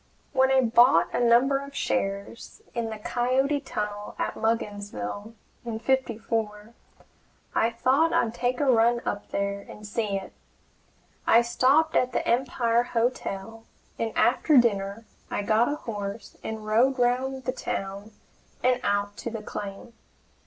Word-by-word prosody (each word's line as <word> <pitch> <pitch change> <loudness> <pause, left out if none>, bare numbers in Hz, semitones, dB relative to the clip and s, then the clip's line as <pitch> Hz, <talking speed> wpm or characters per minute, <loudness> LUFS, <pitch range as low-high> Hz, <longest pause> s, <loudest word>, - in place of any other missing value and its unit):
When 265 0 +4
I 265 0 +5
bought 240 +2 +4
a - - 0
number 245 +3 +4
of 280 0 -10
shares 195 +5 -3
in 235 -2 -2
the 220 - -5
Coyote 255 +6 0
Tunnel 210 -6 -5
at - - -2
Mugginsville, 205 - -3 0.3
in 230 -2 -4
'54, 225 -3 -2 0.8
I 225 - +2
thought 265 +7 +2
I'd 225 -1 +1
take 245 +1 -1
a 290 - +1
run 235 -2 +4
up 205 - -3
there 200 0 -2
and 210 +1 -12
see 210 -1 -1
it. 195 - -8 0.9
I 235 +1 +6
stopped 275 +7 +3
at 250 -1 +2
the - - -1
Empire 240 -1 +2
Hotel, 225 -3 -2 0.4
and 225 -1 -1
after 265 +4 +4
dinner 205 -2 +2 0.2
I 205 - -2
got 220 +3 +3
a - - -1
horse 205 -5 -6
and 220 -1 -5
rode 240 +5 +3
round 260 +2 0
the 255 - -1
town 200 -4 -5 0.5
and 250 0 +3
out 205 0 0
to - - -4
the 225 -2 -6
claim. 205 +3 -7
230 Hz, 145 wpm, -26 LUFS, 210-255 Hz, 0.9 s, I